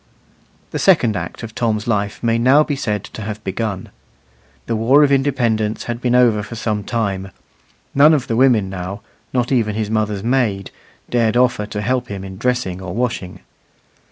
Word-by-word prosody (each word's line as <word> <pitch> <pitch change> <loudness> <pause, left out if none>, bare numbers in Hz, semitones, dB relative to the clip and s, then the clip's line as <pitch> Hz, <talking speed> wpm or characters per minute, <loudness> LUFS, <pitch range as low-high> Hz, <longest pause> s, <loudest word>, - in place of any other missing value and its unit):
The - - -3
second 130 - +4
act 85 +6 -5
of 110 0 -7
Tom's 110 -3 -1
life 105 -2 -1
may 115 0 +2
now 135 +5 +5
be 145 - -2
said 105 -7 -2
to - - -9
have 105 0 -6
begun. 100 -1 -3 0.8
The 115 - -1
war 130 +7 +5
of 140 - +3
independence 120 -6 +1
had 120 0 -5
been 125 -1 +1
over 120 -4 +4
for 105 +3 -8
some 110 -2 -2
time: 100 -4 -2 0.6
none 150 +3 +6
of 135 -4 -1
the 115 - -2
women 120 -5 +4
now 95 +2 -6 0.3
not 125 0 0
even 110 -5 +1
his 110 -1 -2
mother's 105 -2 -1
maid 115 -6 0 0.4
dared 115 -1 +2
offer 125 -4 +2
to 105 -1 -4
help 125 +3 -1
him 100 -2 -6
in 95 0 -9
dressing 125 -8 -1
or 90 0 -6
washing. 110 -6 -3
110 Hz, 180 wpm, -19 LUFS, 105-125 Hz, 0.8 s, none